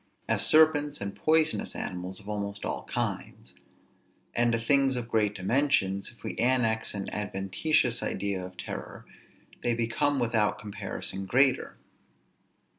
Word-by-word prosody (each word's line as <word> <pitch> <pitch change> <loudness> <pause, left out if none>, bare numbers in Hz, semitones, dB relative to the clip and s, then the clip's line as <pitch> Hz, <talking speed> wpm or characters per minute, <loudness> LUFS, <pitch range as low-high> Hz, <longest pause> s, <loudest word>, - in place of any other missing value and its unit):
As - - +3
serpents 150 -2 +4
and 100 0 -5
poisonous 160 0 +2
animals 90 +2 -5
of 100 - -14
almost 100 -1 -4
all - - -3
kinds. - - -4 0.8
And 120 0 +2
to 115 - +2
things 135 +3 +2
of 120 -2 -3
great 105 -2 +1
dimensions, 100 -2 +1
if 120 - -20
we - - -4
annex 115 -3 +2
an 100 - -4
adventitious 105 - 0
idea 100 -1 -2
of 90 0 -10
terror, - - -7 0.6
they 120 -1 +1
become 120 +5 0
without 115 -4 +1
comparison 100 -3 -4
greater. 135 +4 +2
115 Hz, 130 wpm, -28 LUFS, 100-135 Hz, 0.8 s, serpents